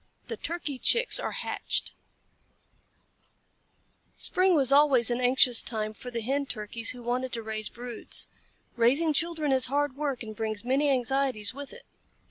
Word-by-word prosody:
THE 460 - -3
TURKEY 330 -8 -4
CHICKS 475 - +3
ARE - - -3
HATCHED - - -2 2.3
Spring 370 -1 +3
was 275 -3 +2
always 275 -5 +5
an 240 +1 -1
anxious 250 -1 +5
time 215 -2 -3
for 250 - -9
the 235 -1 -4
Hen 275 +5 -1
Turkeys 225 0 -4
who 245 -1 -5
wanted 250 +2 -2
to 230 -2 -3
raise 215 -1 -2
broods. 240 -1 -4 0.5
Raising 275 +7 +3
children 320 -1 -1
is 260 -1 +3
hard 285 0 0
work 280 -4 -3
and 215 -1 -8
brings 215 0 -4
many 275 +3 +2
anxieties 255 -4 0
with 280 +1 -8
it. - - -13
255 Hz, 150 wpm, -28 LUFS, 235-285 Hz, 2.3 s, always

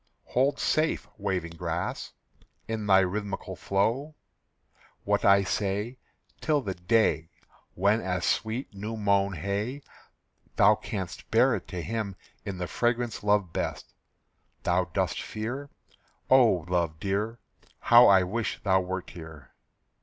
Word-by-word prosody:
Hold 135 +3 +2
safe, 155 +1 0
waving 95 -4 -2
grass, 85 - -4 0.5
in 110 -2 -3
thy 95 -1 +6
rhythmical 100 +2 -3
flow, 120 +10 -1 0.9
What - - +1
I 100 0 +6
say, 105 +5 -2 0.4
Till 150 -2 +1
the 100 -6 -3
day 90 -3 +1 0.5
When 100 +4 +2
as 90 -1 -2
sweet 115 +2 -1
new 105 +3 -5
mown 100 -1 +2
hay 100 - -3 0.7
Thou - - +6
can'st 95 -4 -6
bear - - +4
it - - -7
to 90 -2 -5
him 110 -4 -3 0.3
in 95 -2 -5
the 90 - -3
fragrance 120 +3 -1
loved 105 -4 +2
best. - - -4 0.7
Thou - - +2
dost - - -1
fear? 125 +7 -5 0.6
Oh, 115 -11 +5
love 85 -3 -1
dear, 105 +5 -2 0.4
How 120 +1 +7
I 95 -2 +6
wish 110 +5 -2
thou 95 -2 +4
wert 95 0 -5
here! 80 -6 -11
100 Hz, 130 wpm, -28 LUFS, 95-115 Hz, 0.9 s, How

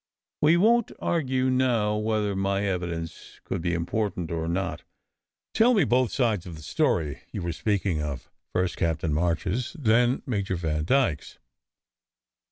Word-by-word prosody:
"We 155 +3 +5
won 230 +5 +4
t - - -15
argue 130 -5 0
now 120 -5 +2
whether 105 -2 0
my 100 +1 0
evidence 85 -3 -4
could - - -3
be 85 0 0
important 90 0 -2
or 80 -1 -2
not. 85 +2 -2 0.7
Tell 235 +2 +5
me 200 - +4
both 125 -1 +2
sides 110 -8 0
of 85 - -7
the 75 - -11
story 80 - 0
you 95 - -4
were 85 - -1
speaking 95 -4 0
of, 75 -2 -5 0.2
first 90 -1 -1
Captain 80 -1 0
March 85 +4 0
s, 120 - -2
then 120 -1 +2
Major 100 -6 -1
Vandyke 80 - +1
s." - - -14
100 Hz, 155 wpm, -26 LUFS, 85-125 Hz, 0.7 s, We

